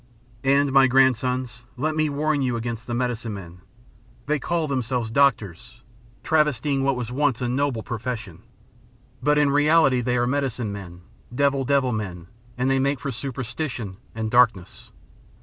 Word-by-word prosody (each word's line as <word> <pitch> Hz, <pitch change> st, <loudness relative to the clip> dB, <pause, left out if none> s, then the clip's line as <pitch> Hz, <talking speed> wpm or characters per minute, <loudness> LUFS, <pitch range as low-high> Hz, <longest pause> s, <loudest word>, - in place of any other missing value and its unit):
"And, 140 Hz, +1 st, +3 dB
my 135 Hz, -1 st, +6 dB
grandsons, 125 Hz, -1 st, +1 dB
let 155 Hz, +4 st, -1 dB
me 155 Hz, -1 st, +1 dB
warn 145 Hz, 0 st, 0 dB
you 125 Hz, -2 st, 0 dB
against 115 Hz, 0 st, -5 dB
the 120 Hz, -, -2 dB
medicine 120 Hz, -3 st, -2 dB
men. 90 Hz, -2 st, -10 dB, 0.6 s
They 150 Hz, 0 st, 0 dB
call 165 Hz, +3 st, -1 dB
themselves 125 Hz, -4 st, -2 dB
doctors, 120 Hz, -4 st, 0 dB, 0.4 s
travestying 150 Hz, -3 st, +1 dB
what 135 Hz, 0 st, +1 dB
was 125 Hz, -1 st, -4 dB
once 140 Hz, -2 st, +1 dB
a 125 Hz, -, -2 dB
noble 125 Hz, -2 st, -1 dB
profession, 115 Hz, -5 st, -5 dB, 0.8 s
but 150 Hz, +3 st, +2 dB
in 145 Hz, -1 st, +3 dB
reality 145 Hz, -3 st, +4 dB
they 125 Hz, 0 st, 0 dB
are 120 Hz, -, +2 dB
medicine 125 Hz, -4 st, -1 dB
men, 90 Hz, -3 st, -9 dB, 0.3 s
devil 140 Hz, 0 st, +1 dB
devil 135 Hz, -1 st, +2 dB
men, 95 Hz, -6 st, -4 dB, 0.3 s
and 125 Hz, +1 st, 0 dB
they 135 Hz, 0 st, +2 dB
make 140 Hz, 0 st, 0 dB
for 140 Hz, -, -4 dB
superstition 125 Hz, -4 st, -5 dB, 0.2 s
and 110 Hz, -1 st, -3 dB
darkness. 115 Hz, -7 st, +2 dB
125 Hz, 150 wpm, -24 LUFS, 115-140 Hz, 0.8 s, my